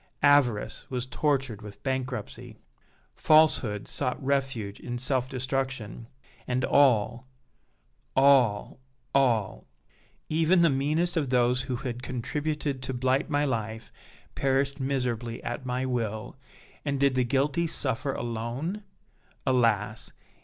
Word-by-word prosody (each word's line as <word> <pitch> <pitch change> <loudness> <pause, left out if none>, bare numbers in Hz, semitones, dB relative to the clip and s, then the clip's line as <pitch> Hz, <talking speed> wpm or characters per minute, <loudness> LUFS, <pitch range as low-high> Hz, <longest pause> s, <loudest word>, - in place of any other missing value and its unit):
Avarice 125 -7 +3
was 125 -1 -3
tortured 135 -5 -1
with 105 -1 -11
bankruptcy. 130 -1 -4 0.6
Falsehood 150 -10 +3
sought 125 - -1
refuge 135 -7 -1
in 120 0 -5
self 130 0 0
destruction; 130 -4 -3 0.4
and 125 +1 0
all 125 -2 +3 0.9
all 130 -7 +4 0.3
all 120 -7 +1 0.6
even 165 +3 +3
the 165 - +5
meanest 155 +6 0
of 145 -5 0
those 125 0 +3
who 130 -1 -3
had 120 0 -5
contributed 140 +3 -3
to 130 0 -4
blight 130 +5 +1
my 145 0 +1
life 110 -4 -3 0.4
perished 135 +1 0
miserably 125 -4 -2
at 130 - -4
my 125 +1 -1
will! 115 -4 -3 0.5
And 140 -2 -1
did 140 -1 +3
the 130 0 +2
guilty 140 +6 +1
suffer 135 -2 -1
alone? 120 - -4 0.6
Alas! 110 -4 +1
130 Hz, 115 wpm, -27 LUFS, 120-140 Hz, 0.9 s, the